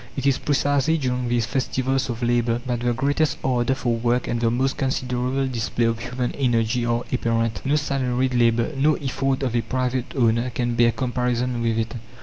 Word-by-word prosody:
It 135 - -2
is 140 -2 +3
precisely 145 +2 +1
during 125 -3 -1
these 120 -2 +1
festivals 130 +2 -1
of 120 0 -4
labour 120 0 +1
that 120 -2 -1
the 120 0 0
greatest 140 +4 +1
ardour 125 0 +1
for 120 -3 0
work 120 +2 0
and 120 - -1
the 115 - +3
most 130 +3 0
considerable 130 0 -1
display 120 -1 -1
of 115 0 0
human 125 +1 -3
energy 120 -3 +1
are 120 0 0
apparent. 115 -2 0
No 140 +2 +1
salaried 130 -3 0
labour, 115 +1 +2
no 150 +3 +3
effort 135 0 -1
of 125 -3 -1
a 120 - +3
private 130 0 -2
owner 115 -1 +2
can 120 0 -1
bear 115 0 +4
comparison 125 -1 -1
with 115 -1 0
it. 115 0 -2
125 Hz, 185 wpm, -23 LUFS, 120-130 Hz, -, bear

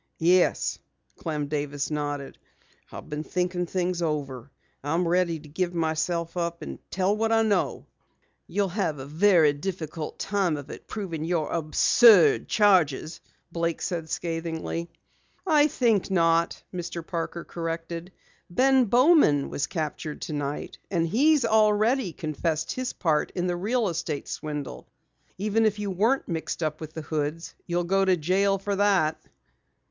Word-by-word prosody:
"Yes," 175 +2 +2 0.4
Clem 150 -3 -3
Davis 145 0 -3
nodded, 145 -2 -4 0.5
"I've - - -9
been 150 +1 -4
thinking 180 +1 -2
things 180 0 -1
over. 140 -5 -3 0.3
I'm 165 +5 0
ready 170 -1 +1
to 150 - -14
give 175 +4 -2
myself 165 +1 -1
up 170 -1 -3
and - - -7
tell 190 +2 +1
what 225 +1 0
I 225 0 +4
know." 215 -2 0 0.6
"You'll 200 -1 0
have 175 -5 -1
a 130 - -7
very 160 0 +4
difficult 160 -1 -5
time 190 -6 0
of 145 - -8
it - - -10
proving 180 -7 -4
your 165 -2 -1
absurd 165 - +5
charges," 175 -7 +2 0.3
Blake 170 -1 -1
said 165 -3 -3
scathingly. 165 0 -3 0.6
"I 305 -4 +5
think 230 -9 +1
not," 165 -2 +2
Mr. 175 -2 -5
Parker 170 0 -4
corrected. 165 +1 -5 0.4
"Ben 260 +7 +4
Bowman 240 - +4
was 145 - -1
captured 155 -2 -4
tonight, 145 -2 -4
and 170 -4 +1
he's 275 - +3
already 220 +1 +3
confessed 160 0 -2
his 255 0 -3
part 155 -3 0
in 180 - -1
the 175 -1 0
real 220 +5 0
estate 160 -4 -3
swindle. 145 - -6 0.5
Even 210 +3 +1
if 215 -2 +2
you 205 -1 -3
weren't 225 +9 +1
mixed 165 -1 -3
up 155 0 -2
with 155 0 -7
the 160 - -5
Hoods, 155 +2 -3
you'd 175 0 0
go 195 +1 +3
to 190 -1 +3
jail 195 +5 +2
for 200 +1 -2
that." 190 -6 +2
170 Hz, 145 wpm, -26 LUFS, 155-195 Hz, 0.6 s, absurd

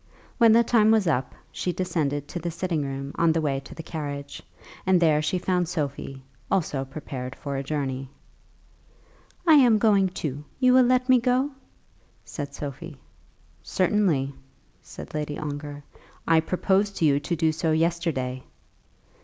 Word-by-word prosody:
When 230 -2 +7
the 235 +1 +6
time 220 -2 +4
was 220 -3 +4
up, 135 -6 0 0.2
she 180 - -2
descended 155 -6 -2
to 175 - -4
the 170 +1 -3
sitting 170 -1 -2
room 135 0 -5
on 165 -1 +4
the 165 - +1
way 140 -3 0
to 135 - -12
the 165 - -7
carriage, 145 -3 -6 0.4
and 190 -1 +3
there 155 -3 +3
she 180 +5 0
found 180 -1 0
Sophie 140 -5 -4 0.3
also 150 -8 0
prepared 135 -2 -7
for 140 -1 -5
a 135 - -1
journey. 135 -2 -3 1.4
"I 325 - +6
am 250 -7 +6
going 200 -3 +3
too. 150 -5 -5 0.2
You 255 -1 +5
will 255 -1 +6
let 255 +1 +2
me 255 -1 +6
go?" 255 +4 +1 0.7
said 140 -2 -6
Sophie. 145 +1 -7 0.6
"Certainly," 180 -8 +1 0.5
said - - -11
Lady 150 -1 -3
Ongar. 145 -1 -6 0.4
"I 165 -1 +5
proposed 190 +4 0
to 165 - +2
you 140 -2 +4
to 145 +4 -2
do 160 -1 +2
so 160 +1 -1
yesterday." 160 -6 -1
160 Hz, 155 wpm, -25 LUFS, 140-190 Hz, 1.4 s, When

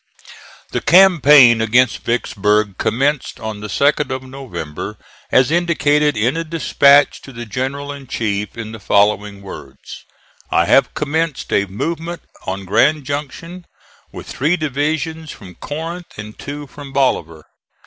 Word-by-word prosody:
The - - -2
campaign 150 -10 +6
against 120 +1 +2
Vicksburg 105 -3 0
commenced 140 +3 -1
on 110 -1 -6
the 105 - -6
2d 145 +7 +1
of 130 0 -4
November 130 - -7 0.3
as 130 +3 +4
indicated 150 -4 +2
in 120 +7 +1
a 165 - -2
dispatch 145 -3 +3
to 135 - -12
the 120 -1 -8
general 135 +6 -4
in 140 -2 -10
chief 105 -2 -3
in 110 -1 -6
the 110 - -9
following 100 0 +1
words: 95 - -11 0.4
"I - - +2
have - - +3
commenced 155 0 -2
a 100 - +2
movement 165 - -4 0.2
on 95 +1 -4
Grand 150 +10 +2
Junction, 150 +5 -6 0.4
with - - -9
three 155 +7 0
divisions 155 +2 -2
from 95 -8 -11
Corinth 165 - -7
and 105 +1 -8
two 145 +1 -7
from 140 0 -11
Bolivar. 85 - 0
135 Hz, 140 wpm, -18 LUFS, 105-150 Hz, 0.4 s, campaign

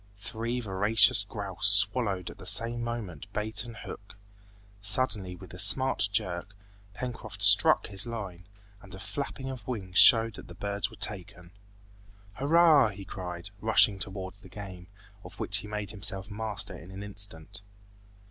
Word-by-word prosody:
Three 115 +4 -6
voracious 105 0 +2
grouse 100 -1 -2 0.2
swallowed 100 -6 -5
at - - -17
the - - -12
same 120 +1 +2
moment 110 -10 -8
bait 105 0 -2
and 115 -2 -12
hook. 100 -1 -12 0.6
Suddenly 100 -3 -2
with 90 0 -15
a 90 - -10
smart 105 0 +5
jerk, 100 -1 -5 0.4
Pencroft 110 -5 -5
"struck" 100 0 +6
his 100 +3 +2
line, 95 -6 -9 0.3
and 95 -1 -12
a - - -12
flapping 135 +4 -7
of 120 -5 -11
wings 95 -7 -3
showed 115 -1 +6
that - - -13
the 90 - -13
birds 100 +2 -3
were - - -15
taken. 90 -4 -2 0.8
"Hurrah!" 145 - +3
he 100 -1 -11
cried, 90 0 -9
rushing 110 -2 +2
towards 95 0 -6
the 95 - -16
game, 95 -3 -11 0.4
of 90 +2 -14
which 100 - +1
he 105 - -5
made 105 -1 -6
himself 100 -1 -2
master 105 -1 -5
in 85 - -14
an 95 +1 -10
instant. 100 -2 -7
100 Hz, 155 wpm, -27 LUFS, 95-110 Hz, 0.8 s, struck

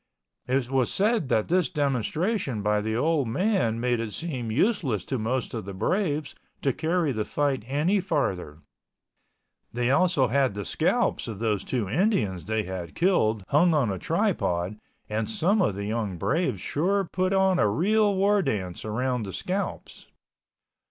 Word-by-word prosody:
It 130 -1 +1
was 130 -3 +1
said 210 - +1
that 110 - +2
this 180 0 +2
demonstration 145 - -1
by 105 0 +2
the 110 +1 -2
old 145 +1 +1
man 180 - +1
made 120 0 +1
it 110 -2 -4
seem 130 -9 -4
useless 135 - +1
to 130 - -2
most 125 +4 -2
of 110 -5 -4
the 100 -1 -7
braves 155 - -1 0.3
to 135 - +2
carry 165 0 0
the 110 -4 -1
fight 140 0 -1
any 155 +9 +1
farther. 95 - -2 1.1
They 120 +1 0
also 140 -4 +3
had 130 -3 +2
the 100 -1 -4
scalps - - 0
of 110 -4 -5
those 105 -3 -1
two 120 -6 -2
Indians 110 - 0
they 110 +1 -1
had 90 -3 -6
killed 115 - +2
hung 160 +3 +4
on 130 -8 +2
a 95 - -4
tripod 90 +5 -1 0.3
and 110 0 -2
some 195 - +2
of 105 - +1
the 100 +1 -4
young 105 -4 -2
braves 135 - 0
sure 190 - 0
put 185 +2 -1
on 190 -1 +3
a 105 - +4
real 205 - +2
war 200 +2 +3
dance 95 - -3
around 125 +3 -1
the 95 - -6
scalps. 185 - -4
130 Hz, 165 wpm, -26 LUFS, 105-175 Hz, 1.1 s, hung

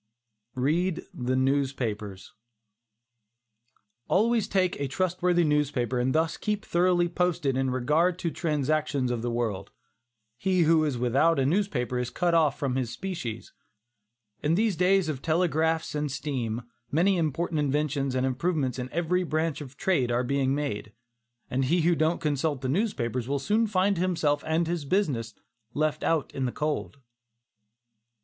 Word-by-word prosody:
READ 160 +7 0
THE 125 0 -1
NEWSPAPERS. 130 -7 -1 1.7
Always 225 +2 +2
take 185 -5 0
a 140 - -1
trustworthy 180 +3 +1
newspaper 145 -5 +1
and 130 +3 0
thus 160 +1 +1
keep 210 -1 -2
thoroughly 175 0 +2
posted 170 -5 0
in 135 0 +1
regard 150 +8 +1
to 180 -2 -2
the - - -9
transactions 150 -4 0
of 120 -2 -2
the 120 - -2
world. 110 -5 -2 0.7
He 185 +3 +2
who 160 0 +4
is 140 -5 -1
without 135 +7 +2
a 135 - +2
newspaper 140 -8 0
is 125 -1 -2
cut 170 +6 0
off 155 -4 +3
from 130 -2 -1
his 125 -3 -1
species. 125 - -5 0.9
In 155 +3 +2
these 215 0 +2
days 185 +1 +3
of 145 -4 -3
telegraphs 160 0 +1
and 150 -1 -2
steam, 125 -5 -3 0.3
many 180 +6 +3
important 160 0 -1
inventions 145 -2 0
and 130 0 +1
improvements 130 -1 -1
in 125 0 -4
every 175 +2 +1
branch 160 -2 -1
of 135 -1 -10
trade 165 -11 +1
are 120 +1 +1
being 135 +1 +1
made, 105 -8 -3 0.5
and 130 +1 0
he 170 +6 +2
who 170 +2 +3
don't 160 +1 +1
consult 150 -2 -1
the 130 - -2
newspapers 130 - -1
will 140 +1 0
soon 215 +11 +1
find 195 -2 +1
himself 160 -5 +1
and 160 +2 +1
his 170 -1 -2
business 135 - -1 0.4
left 155 0 0
out 160 -3 0
in 135 - -2
the 125 - -1
cold. 150 -1 -3
150 Hz, 155 wpm, -27 LUFS, 130-175 Hz, 1.7 s, who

